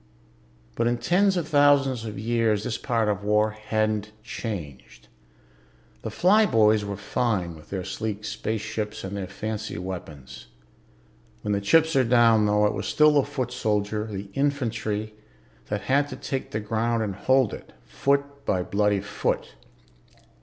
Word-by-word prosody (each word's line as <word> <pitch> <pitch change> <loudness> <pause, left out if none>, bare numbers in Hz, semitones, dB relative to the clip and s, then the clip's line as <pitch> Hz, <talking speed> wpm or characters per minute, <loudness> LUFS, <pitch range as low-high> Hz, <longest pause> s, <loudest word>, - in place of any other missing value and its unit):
But 115 - +1
in 120 0 +1
tens 190 +7 +2
of 165 -3 -2
thousands 140 -5 +3
of 105 -2 -6
years 110 -1 +1
this 120 -1 -3
part 115 -4 0
of 105 -1 -1
war 105 +1 +2
hadn't 110 -1 -1
changed. 90 - -7 0.9
The - - -4
flyboys 115 - +4
were 100 -1 -4
fine 95 -6 -1
with 75 - -15
their 95 -2 -3
sleek 105 +2 -4
spaceships 110 -1 -4
and 95 +1 -5
their 100 -2 -4
fancy 105 +1 -5
weapons. 85 -7 -8 1.0
When - - -1
the 100 0 0
chips 160 +10 +3
are 135 - +5
down, 115 -3 +4
though, 105 0 +3
it 105 - +2
was 95 -1 -4
still 150 +9 +5
the 145 - +5
foot 130 -3 -3
soldier, 105 -2 -1
the 100 -2 -7
infantry, 115 -6 -1 0.5
that 105 0 -2
had 140 +2 +2
to 135 - -7
take 130 0 -4
the 105 - -3
ground 115 +2 0
and 100 -3 -3
hold 130 +4 +2
it, - - -9
foot 140 0 -1
by 90 -2 0
bloody 105 +1 +1
foot. 100 - -2
110 Hz, 155 wpm, -25 LUFS, 105-125 Hz, 1.0 s, are